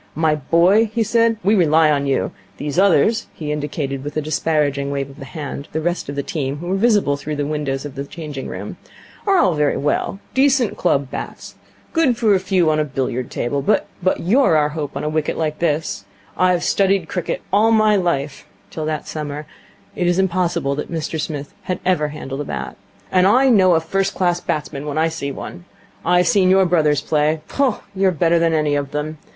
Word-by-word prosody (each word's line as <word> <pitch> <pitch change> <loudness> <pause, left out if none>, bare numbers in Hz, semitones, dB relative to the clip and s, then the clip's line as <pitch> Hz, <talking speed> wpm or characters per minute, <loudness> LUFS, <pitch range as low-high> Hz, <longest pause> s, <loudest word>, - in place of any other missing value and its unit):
'My 160 -1 +2
boy,' 170 +9 +3
he 230 0 +1
said, 230 +1 +2
'we 205 - +3
rely 160 -5 +4
on 140 -1 0
you. 135 - 0 0.3
These 145 +3 -2
others' 200 +4 +3
he 150 -2 -4
indicated 145 -2 -3
with 145 +1 -5
a - - +1
disparaging 145 -2 0
wave 140 -1 -3
of 140 - -16
the 135 - -8
hand 140 +1 -6
the 160 - 0
rest 175 -1 -2
of 140 - -4
the 140 - -2
team, 145 -6 -3
who 175 +4 -6
were 190 - +1
visible 200 -9 +2
through 150 +1 -5
the 145 0 -2
window 150 -2 -2
of 135 +1 -7
the 140 - -5
changing 150 -3 -7
room - - -7 0.5
'are 390 -1 +4
all 185 - +4
very 150 -1 +1
well. 150 +6 -1 0.2
Decent 265 -3 +3
club 140 -6 0
bats. - - -7 0.4
Good 300 -8 +2
for 225 -4 +3
a 190 - +3
few 185 -4 +2
on 155 - +1
a - - +3
billiard 130 -3 -3
table. 140 +4 -2
But 210 - +2 0.3
you're 200 - +3
our 150 -1 +2
hope 150 -2 -5
on - - -4
a - - -1
wicket 155 0 -1
like 155 -1 -2
this. 150 -11 -1 0.3
I 185 - +3
have 180 -1 +1
studied 195 -3 +2
cricket 180 - -3
all 215 +3 +4
my 215 -1 +4
life' 150 -7 -1 0.2
till 155 - -4
that 155 -1 -3
summer 150 -1 -5 0.5
it 175 - 0
is 175 0 +2
improbable 175 -6 0
that 150 - -5
Mr 160 -1 -3
Smith 145 -2 -5 0.2
had 180 - -1
ever 180 -5 +2
handled 145 -2 -6
a - - -4
bat 65 - -5 0.4
'and 185 0 +4
I 255 +6 +5
know 190 -7 +5
a - - +4
first 195 +4 -1
class 175 -2 +1
batsman 150 -1 -3
when 145 0 -3
I 160 +1 +2
see 150 -3 -4
one. 175 +5 -8 0.4
I've 180 +1 +3
seen 195 -5 +4
your 190 0 +5
brothers 155 -5 +2
play. 155 +1 +1
Pooh, 275 -2 +1 0.2
you're 190 0 +2
better 170 0 +2
than 165 -1 +2
any 150 -2 +1
of 145 -1 -1
them. 150 +1 -4
160 Hz, 210 wpm, -20 LUFS, 145-185 Hz, 0.5 s, I